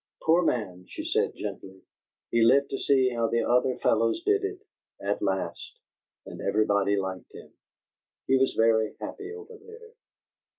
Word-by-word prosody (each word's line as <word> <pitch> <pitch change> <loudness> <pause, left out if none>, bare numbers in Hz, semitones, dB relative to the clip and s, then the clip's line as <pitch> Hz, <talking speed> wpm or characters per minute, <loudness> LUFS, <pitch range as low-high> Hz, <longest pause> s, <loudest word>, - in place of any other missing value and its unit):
"Poor 165 +2 +4
man," 95 - -2
she - - -7
said, - - 0
gently, 95 0 -8 0.5
"he 115 - +2
lived 135 +5 +4
to 135 - -3
see 130 -2 +3
'how 115 -1 0
the 115 +1 0
other 125 +1 +2
fellows 115 - +1
did 410 0 +2
it' 400 +1 -5 0.3
at - - -2
last, - - -3 0.5
and - - -9
everybody 100 0 +2
liked 95 -2 -4
him. - - -13 0.7
He 135 - +3
was 135 0 +2
very 110 -1 +2
happy 405 0 -7
over 440 0 -11
there." 455 +1 -14
125 Hz, 155 wpm, -27 LUFS, -, 0.7 s, Poor